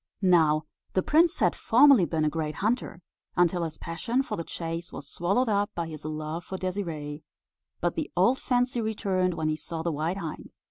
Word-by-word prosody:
Now 160 Hz, -4 st, +4 dB, 0.3 s
the 185 Hz, -, +2 dB
prince 325 Hz, +2 st, +4 dB
had -, -, +2 dB
formerly 250 Hz, -4 st, +6 dB
been 155 Hz, 0 st, 0 dB
a -, -, +3 dB
great 155 Hz, -1 st, -3 dB
hunter, 210 Hz, -4 st, -1 dB, 0.3 s
until 175 Hz, 0 st, +3 dB
his 160 Hz, -2 st, -4 dB
passion 235 Hz, +10 st, -1 dB
for -, -, -4 dB
the 165 Hz, -, -4 dB
chase 165 Hz, +1 st, -5 dB
was 140 Hz, -, -8 dB
swallowed 195 Hz, -, 0 dB
up 205 Hz, -1 st, +1 dB
by 170 Hz, -, -1 dB
his 155 Hz, -2 st, -8 dB
love 155 Hz, +2 st, -4 dB
for 190 Hz, -, -6 dB
Désirée; 165 Hz, -6 st, -4 dB, 0.6 s
but -, -, +1 dB
the -, -, -3 dB
old 260 Hz, +2 st, +4 dB
fancy 245 Hz, -1 st, +1 dB
returned 190 Hz, -5 st, 0 dB
when 155 Hz, -, -1 dB
he 155 Hz, -, +1 dB
saw 160 Hz, +1 st, -6 dB
the 170 Hz, -, 0 dB
white 160 Hz, +5 st, -2 dB
hind. 165 Hz, -5 st, -6 dB
175 Hz, 190 wpm, -27 LUFS, 160-205 Hz, 0.6 s, formerly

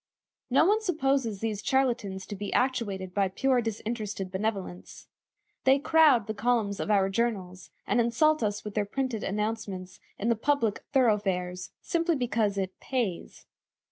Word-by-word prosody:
No 265 Hz, +5 st, +4 dB
one 425 Hz, +4 st, +3 dB
supposes 270 Hz, -, 0 dB
these 215 Hz, -2 st, -2 dB
charlatans 235 Hz, -8 st, 0 dB
to 205 Hz, -, -6 dB
be 205 Hz, +1 st, -5 dB
actuated 205 Hz, -8 st, -1 dB
by 200 Hz, 0 st, +2 dB
pure 255 Hz, +6 st, +1 dB
disinterested 215 Hz, -3 st, -4 dB
benevolence. 195 Hz, -2 st, -4 dB, 0.6 s
They 265 Hz, +1 st, +5 dB
crowd 285 Hz, -6 st, +4 dB
the 215 Hz, -, -3 dB
columns 220 Hz, -2 st, 0 dB
of -, -, -3 dB
our 200 Hz, -2 st, +4 dB
journals, 195 Hz, -4 st, -2 dB, 0.2 s
and 245 Hz, -, +2 dB
insult 305 Hz, +7 st, +2 dB
us 205 Hz, -1 st, -1 dB
with 210 Hz, -, -6 dB
their 210 Hz, -, +1 dB
printed 250 Hz, 0 st, -2 dB
announcements 200 Hz, -3 st, -3 dB, 0.2 s
in 220 Hz, -, -1 dB
the 235 Hz, -, +3 dB
public 230 Hz, -3 st, +1 dB
thoroughfares, 190 Hz, -8 st, +1 dB
simply 335 Hz, 0 st, +1 dB
because 225 Hz, -6 st, 0 dB
"it 190 Hz, -1 st, -3 dB
pays." 235 Hz, -10 st, -3 dB
220 Hz, 145 wpm, -28 LUFS, 195-255 Hz, 0.6 s, They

